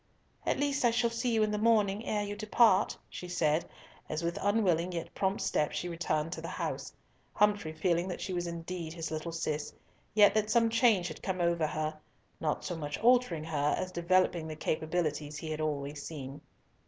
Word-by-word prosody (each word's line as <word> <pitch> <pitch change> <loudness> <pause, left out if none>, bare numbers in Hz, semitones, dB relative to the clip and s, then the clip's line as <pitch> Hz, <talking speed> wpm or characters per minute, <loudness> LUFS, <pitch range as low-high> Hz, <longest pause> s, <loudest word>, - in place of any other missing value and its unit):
"At - - +1
least 285 -1 +1
I 240 - +6
shall 235 0 +1
see 235 +1 -1
you 220 -1 +3
in 215 - +1
the 210 - -1
morning, 215 -2 +2
ere 210 -1 0
you 205 0 -4
depart," 215 -1 +3
she 180 - -8
said, 165 -2 +1 0.4
as 155 +2 -2
with 170 +1 -1
unwilling 185 -5 +2
yet 170 -1 -5
prompt 195 0 0
steps 150 - 0
she 175 - -2
returned 165 -2 -1
to - - -5
the - - -5
house, - - -4 0.4
Humfrey 205 -6 +2
feeling 170 +2 0
that 180 - -4
she 190 - -4
was 175 -1 -2
indeed 170 -1 -5
his 165 -2 -5
little 155 +1 -3
Cis, 155 -2 -2 0.4
yet 210 -1 +7
that 215 0 +1
some 230 0 +3
change 225 -6 +4
had 155 - -8
come 185 -2 -2
over 170 -2 +2
her, 155 0 -3 0.4
not 155 -2 -1
so 175 - -3
much 150 -2 -4
altering 240 -9 +3
her, 150 -2 0
as 185 0 -3
developing 175 -1 +2
the 155 - -5
capabilities 155 -2 -1
he 155 +1 -5
had 155 0 -3
always 145 -1 -2
seen. 140 -1 -7
175 Hz, 195 wpm, -31 LUFS, 155-205 Hz, 0.4 s, yet